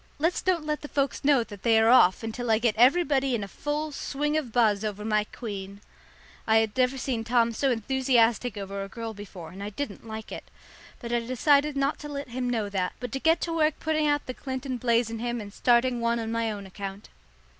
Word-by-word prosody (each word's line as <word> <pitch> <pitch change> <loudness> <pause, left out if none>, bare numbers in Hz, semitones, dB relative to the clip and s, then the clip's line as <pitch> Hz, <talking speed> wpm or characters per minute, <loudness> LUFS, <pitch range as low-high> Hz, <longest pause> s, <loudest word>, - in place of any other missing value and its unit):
"Let's 330 +4 0
don't 350 -4 0
let 300 0 -2
the 295 - -7
folks 280 -1 -1
know 275 -4 +4
that 205 -3 -11
they 230 -2 +4
are 220 +1 +5
off 190 -6 +5
until 230 +2 -4
I 220 - +5
get 230 -1 +1
everybody 270 +1 +3
in 215 - -2
a - - -5
full 295 +7 -3
swing 295 +1 -2
of 295 -7 -1
buzz 220 -3 +3
over 210 -1 -4
my 215 -1 +1
queen." 200 -4 -7 0.7
I 220 0 +5
had 220 -1 +1
never 255 +1 +2
seen 245 -3 -2
Tom 235 0 +2
so 270 +5 +1
enthusiastic 240 -2 +1
over 195 0 -4
a 195 - -8
girl 230 +1 -6
before, 190 -5 -10
and 190 +2 -10
I 205 - -4
didn't 220 -1 -6
like 220 0 -7
it. - - -8 0.5
But 235 -1 -5
I 240 - +3
decided 280 +5 +2
not 275 +2 0
to 295 - -7
let 280 -2 -5
him 250 +1 -2
know 225 -4 -1
that, 190 -2 -2
but 245 -2 -5
to 270 - -3
get 325 +4 +3
to 335 - -2
work 310 -2 +2
putting 310 -1 0
out 290 0 +1
the 255 - -5
Clinton 260 0 -4
blaze 235 -1 +1
in 225 - -5
him 240 0 -2
and 205 -2 -8
starting 240 +1 +2
one 235 0 +1
on 225 -1 -3
my 230 -1 0
own 200 -2 -6
account. 195 +1 -8
235 Hz, 230 wpm, -27 LUFS, 215-275 Hz, 0.7 s, are